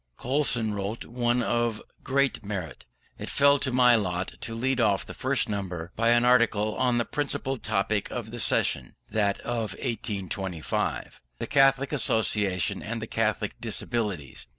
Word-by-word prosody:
Coulson 125 -5 +1
wrote 100 +3 -4
one 120 0 0
of 120 -2 0 0.2
great 140 -3 +1
merit. 100 -6 -5 0.3
It - - -5
fell 140 0 +4
to 130 - -1
my 125 -1 +6
lot 90 -4 -1
to 115 - -4
lead 130 +2 +1
off 100 -4 +2
the - - -8
first 130 +1 0
number 95 -5 -4
by 115 +1 +2
an 120 +1 +4
article 115 -4 +3
on 125 -2 +2
the 120 - +1
principal 135 -2 -2
topic 105 -3 -1
of 115 -3 -5
the 120 - -6
session - - 0 0.2
(that 100 -2 +1
of 115 -5 -2
1825), 95 - -3 0.2
the - - -3
Catholic 135 -1 +3
Association 105 -7 +1
and 115 +2 -4
the 110 - -4
Catholic 110 -1 -1
Disabilities. 100 - -3
115 Hz, 150 wpm, -27 LUFS, 100-125 Hz, 0.3 s, my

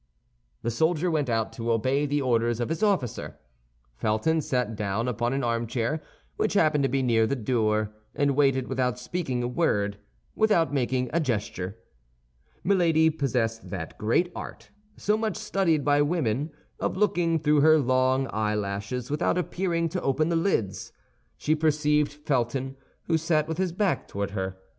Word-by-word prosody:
The 115 - 0
soldier 160 +7 +1
went 150 -5 0
out 115 -3 0
to 115 0 -2
obey 130 +6 +1
the 145 0 0
orders 120 -2 +1
of 120 - -1
his 165 - -2
officer. 190 - 0 0.6
Felton 115 - +1
sat 125 -5 -1
down 105 +3 -1
upon 120 0 -1
an 135 +1 -1
armchair 115 +5 -1 0.4
which - - 0
happened 155 -5 +3
to - - +1
be 135 0 0
near 115 -3 +3
the 140 - 0
door, 110 -3 0 0.2
and 140 -1 +1
waited 135 -3 +2
without 125 -1 0
speaking 125 -1 -3
a - - 0
word, 105 -8 0 0.3
without 205 -9 +2
making 125 -2 0
a 170 - +3
gesture. 105 - -2 0.9
Milady 165 -4 +3
possessed 120 -6 -1
that 85 -5 -5
great 145 +12 +1
art, - - -8 0.3
so 210 - +1
much 220 -4 -2
studied 165 -7 +1
by 145 0 +4
women, 145 -3 0 0.3
of - - -2
looking 175 -5 +2
through 150 -1 +3
her 155 +1 +6
long 130 -1 +2
eyelashes 105 +3 -2
without 150 +4 +1
appearing 175 -2 -1
to 180 +3 -3
open 155 +4 +1
the 170 - +1
lids. 165 - -1 0.5
She 155 - +1
perceived 150 -1 +2
Felton, 135 -2 -2 0.3
who 165 -1 +1
sat 155 -1 +1
with 160 +1 -4
his 185 -2 +1
back 190 +2 0
toward 100 0 -3
her. 95 -2 -3
135 Hz, 160 wpm, -26 LUFS, 115-160 Hz, 0.9 s, her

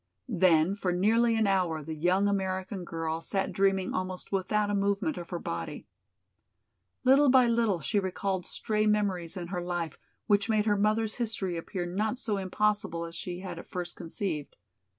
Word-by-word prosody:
Then 180 -5 +4
for 195 -3 -1
nearly 225 +6 +3
an 220 -1 +2
hour 180 -6 +1
the 160 +2 -5
young 180 +6 +2
American 190 -1 -2
girl 165 -1 -3
sat 195 +3 -1
dreaming 195 0 +1
almost 185 0 -4
without 205 +2 +1
a - - -1
movement 200 +9 +1
of 170 - -7
her 175 - -3
body. - - -5 1.2
Little 270 +2 +6
by 255 -1 +6
little 230 -7 +2
she 205 +8 +1
recalled 190 0 -2
stray 215 +2 0
memories 195 -4 0
in 175 -1 -5
her 180 -1 -2
life 175 -3 -3 0.3
which 205 +1 +2
made 215 -1 +2
her 210 -2 +3
mother's 215 +2 +1
history 210 -6 -2
appear 175 +2 -4
not 210 +7 -1
so 220 -5 -2
impossible 190 -3 0
as 165 - -9
she 180 +1 -5
had 180 -3 -6
at - - -11
first 175 -1 -5
conceived. 165 -3 -3
190 Hz, 170 wpm, -29 LUFS, 175-210 Hz, 1.2 s, Little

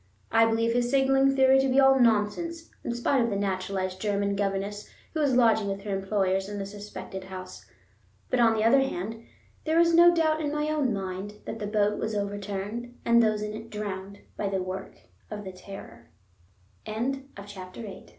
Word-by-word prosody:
I 225 0 +5
believe 230 +1 +1
his 240 0 +1
signaling 270 0 +3
theory 265 0 +5
to 270 0 +2
be 260 +2 +4
all 270 0 +6
nonsense, 245 +10 +1
in - - -2
spite 245 +2 +2
of 235 - 0
the 205 - -2
naturalized 190 -1 -2
German 200 -1 0
governess 200 +1 -2 0.2
who 315 - -2
was 280 -4 +2
lodging 225 -4 +4
with 195 0 -4
her 205 -2 -2
employers 195 -1 0
in 205 - -5
the 195 - -3
suspected 200 -1 -8
house. 185 -1 -9 0.6
But, 255 - +2
on 225 -1 +5
the 215 - 0
other 240 +5 +6
hand, 225 -3 -3 0.4
there 320 +1 +2
is 335 0 +4
no 345 +1 +8
doubt 315 -2 +2
in 295 -2 -1
my 300 0 -1
own 290 -5 +1
mind 195 0 -4
that 225 - -5
the 205 - -3
boat 210 0 +1
was 220 -1 -2
overturned 205 +4 -4
and 235 0 +5
those 215 -2 +1
in 210 0 -4
it 225 +1 -8
drowned 200 -2 -6
by 200 - -2
the 195 - -1
wor 185 +1 -5
215 Hz, 170 wpm, -27 LUFS, 200-260 Hz, 0.6 s, no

